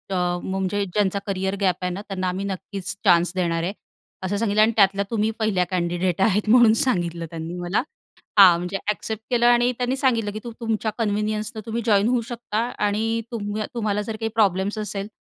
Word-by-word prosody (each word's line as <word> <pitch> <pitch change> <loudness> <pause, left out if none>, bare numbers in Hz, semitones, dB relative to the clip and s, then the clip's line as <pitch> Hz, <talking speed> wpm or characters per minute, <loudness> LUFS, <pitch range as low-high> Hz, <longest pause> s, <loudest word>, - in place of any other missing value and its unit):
अ, 175 -1 0
म्हणजे 190 +1 -1
ज्यांचा 200 +1 0
career 190 0 -1
gap 185 -3 +3
आहे 180 0 -1
ना, 195 - -5
त्यांना 185 -2 -3
आम्ही 190 +2 -3
नक्कीच 195 0 -5
चान्स 175 -2 +5
देणार 170 -2 0
आहे, 185 +4 -2 0.5
असं 195 +2 -1
सांगितलं 215 -1 +2
आणि 220 +1 +5
त्यातल्या 200 -1 +4
तुम्ही 220 -1 +1
पहिल्या 205 -5 +1
कँडिडेट 175 0 -1
आहेत 210 +1 +2
म्हणून 235 -1 +7
सांगितलं 170 -8 0
त्यांनी 165 +1 -6
मला. 175 +3 0 0.6
हां, 180 -4 +9
म्हणजे 180 +3 -3
ॲक्सेप्ट 220 +1 -3
केलं 240 -2 +2
आणि 240 +1 +4
त्यांनी 250 +1 0
सांगितलं 230 -6 +1
की 215 - -6
तू 240 - -6
तुमच्या 220 -1 -1
कन्व्हिनियन्सनं 215 0 -1
तुम्ही 230 +1 -3
जॉइन 205 -2 +3
होऊ 250 -1 +2
शकता 230 -2 -3 0.3
आणि 225 +3 0
तुम्ह 210 -2 -3
तुम्हाला 210 -3 -1
जर 220 +1 -5
काही 225 -1 -1
प्रॉब्लेम्स 200 -1 +2
असेल, 205 -1 -4
205 Hz, 185 wpm, -23 LUFS, 185-220 Hz, 0.6 s, हां